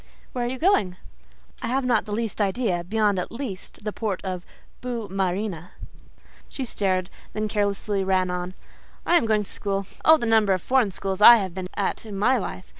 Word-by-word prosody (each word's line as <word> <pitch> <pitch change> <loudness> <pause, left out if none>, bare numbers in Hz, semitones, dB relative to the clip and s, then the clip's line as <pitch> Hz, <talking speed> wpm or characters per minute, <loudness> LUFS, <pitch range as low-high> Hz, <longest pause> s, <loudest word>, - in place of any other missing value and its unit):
"Where 245 -1 -1
are - - -1
you 260 - -4
going?" 250 - +2 0.6
"I - - -3
have 260 +2 0
not 240 -3 +2
the 210 - -8
least 220 0 -2
idea—beyond, 205 -1 +1
at 180 - -4
least, 230 -6 -7
the 210 -1 -3
port 210 -5 -2
of 185 -1 -4 0.3
Boue 240 -4 -4
Marine." 190 -2 -2 0.8
She 265 - -4
stared, 185 -5 -1 0.2
then 215 0 -1
carelessly 205 -1 -1
ran 185 -1 +1
on: 180 +1 -4 0.5
"I 350 - +3
am 230 - +1
going 215 -1 +2
to - - -9
school. 195 -1 -2 0.2
Oh, 320 0 +7
the 240 - -3
number 220 -3 +4
of 185 - -1
foreign 255 -5 +3
schools 195 +1 -4
I 235 +3 +11
have 190 -5 -3
been 185 0 -5
at 200 - -1
in 210 -3 -7
my 250 +5 +3
life! 185 -2 -6
205 Hz, 190 wpm, -24 LUFS, 190-230 Hz, 0.8 s, I